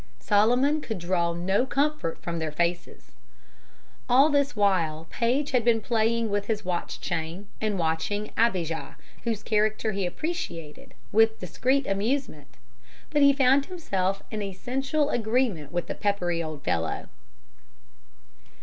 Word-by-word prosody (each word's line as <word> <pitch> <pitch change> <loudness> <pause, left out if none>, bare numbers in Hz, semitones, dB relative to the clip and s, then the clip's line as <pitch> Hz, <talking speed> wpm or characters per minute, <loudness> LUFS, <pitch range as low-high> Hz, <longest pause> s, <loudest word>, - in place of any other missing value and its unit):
Solomon 245 +9 +3
could 220 -7 -4
draw 170 -1 0
no 185 +6 +1
comfort 285 - 0
from 170 -1 -3
their 160 -1 -2
faces. 170 +2 -2 1.0
All 270 +5 +6
this 285 -2 +1
while 170 -6 +1
Paige 255 +5 0
had 250 -2 +2
been 230 -1 +4
playing 225 0 +1
with 205 0 -1
his 215 -3 -2
watch 180 -1 -3
chain 165 +5 -4
and 215 -2 0
watching 170 +6 -1
Abijah, 180 -8 0 0.3
whose 225 -3 -2
character 215 0 +1
he 195 -2 -1
appreciated, 260 - -5 0.2
with 220 +1 +4
discreet 260 - 0
amusement; 230 +8 -1 0.6
but 295 -1 +2
he 280 0 +8
found 275 0 +3
himself 195 - -2
in 215 -1 -3
essential 270 - -1
agreement 220 - 0
with 175 0 -1
the - - -4
peppery 180 -5 0
old 155 -3 -6
fellow. 80 -1 -1
210 Hz, 130 wpm, -26 LUFS, 175-255 Hz, 1.0 s, he